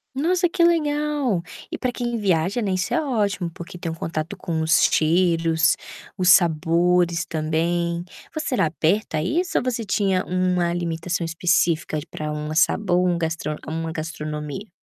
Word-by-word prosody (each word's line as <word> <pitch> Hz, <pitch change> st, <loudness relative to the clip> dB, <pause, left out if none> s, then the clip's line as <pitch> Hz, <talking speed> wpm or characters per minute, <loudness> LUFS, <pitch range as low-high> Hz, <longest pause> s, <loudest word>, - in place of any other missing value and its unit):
Nossa, 350 Hz, +4 st, +2 dB
que 345 Hz, -1 st, +1 dB
legal! 295 Hz, -, +1 dB, 0.3 s
E -, -, -3 dB
para 255 Hz, -, -1 dB
quem 240 Hz, -1 st, -3 dB
viaja, 195 Hz, +2 st, +1 dB
né, 195 Hz, -, -1 dB
isso 185 Hz, 0 st, -1 dB
é -, -, +3 dB
ótimo, 205 Hz, -, -1 dB
porque 170 Hz, +1 st, -9 dB
tem 170 Hz, -1 st, -4 dB
um 160 Hz, -, -5 dB
contato 165 Hz, +4 st, -4 dB
com 170 Hz, -3 st, -3 dB
os 160 Hz, +1 st, +4 dB
estilos, 165 Hz, 0 st, +3 dB, 0.4 s
os 180 Hz, -1 st, +3 dB
sabores 170 Hz, 0 st, +3 dB
também. 170 Hz, +2 st, -1 dB, 0.3 s
Você 310 Hz, -4 st, -2 dB
era 165 Hz, -, +3 dB
aberto 165 Hz, +7 st, 0 dB
a 155 Hz, -, +1 dB
isso 340 Hz, -, 0 dB
ou -, -, -4 dB
você 240 Hz, -3 st, -2 dB
tinha 190 Hz, -1 st, +1 dB
uma 180 Hz, -1 st, +1 dB
alimentação 170 Hz, 0 st, -2 dB
específica 165 Hz, -2 st, +1 dB
de 150 Hz, -, -10 dB
pra 155 Hz, 0 st, -5 dB
uma 150 Hz, +1 st, -4 dB
sabor 180 Hz, +2 st, +2 dB
um 175 Hz, -1 st, +1 dB
gastro 160 Hz, -2 st, -2 dB
uma 165 Hz, +1 st, -3 dB
gastronomia? 155 Hz, +3 st, -5 dB
175 Hz, 160 wpm, -23 LUFS, 165-205 Hz, 0.4 s, os